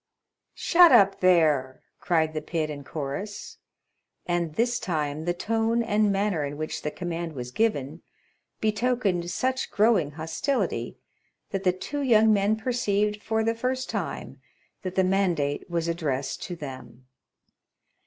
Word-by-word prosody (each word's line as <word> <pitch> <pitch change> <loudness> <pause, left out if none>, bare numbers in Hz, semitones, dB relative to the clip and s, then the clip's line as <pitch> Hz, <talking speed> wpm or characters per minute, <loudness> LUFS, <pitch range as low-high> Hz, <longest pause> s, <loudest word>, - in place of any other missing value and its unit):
"Shut 350 -2 +6
up, 200 -5 +5
there!" 155 -8 +3 0.2
cried 160 -3 +1
the 155 - -3
pit 155 -3 -2
in 145 -1 -7
chorus. 150 +9 -6 0.7
And 170 -3 -1
this 240 +1 +1
time 155 -3 -2
the 175 - +1
tone 225 +4 0
and 210 -2 +2
manner 195 -5 0
in 145 0 -4
which 155 0 -4
the 150 - -2
command 170 0 -4
was 125 -3 -6
given, 160 - -1 0.6
betokened 215 -5 0
such 260 +7 -1
growing 205 -9 +2
hostility 160 - -2 0.5
that 195 -1 -2
the 185 - +4
two 275 +11 -5
young 220 -4 +5
men 205 +1 +2
perceived, 210 -3 0
for 220 +1 0
the 225 +1 +1
first 255 +2 -2
time, - - -5 0.4
that 185 -2 -5
the 190 - +3
mandate 180 -7 0
was 170 -1 -1
addressed 140 -6 -2
to 175 - -5
them. 130 -5 -9
185 Hz, 140 wpm, -26 LUFS, 155-220 Hz, 0.7 s, Shut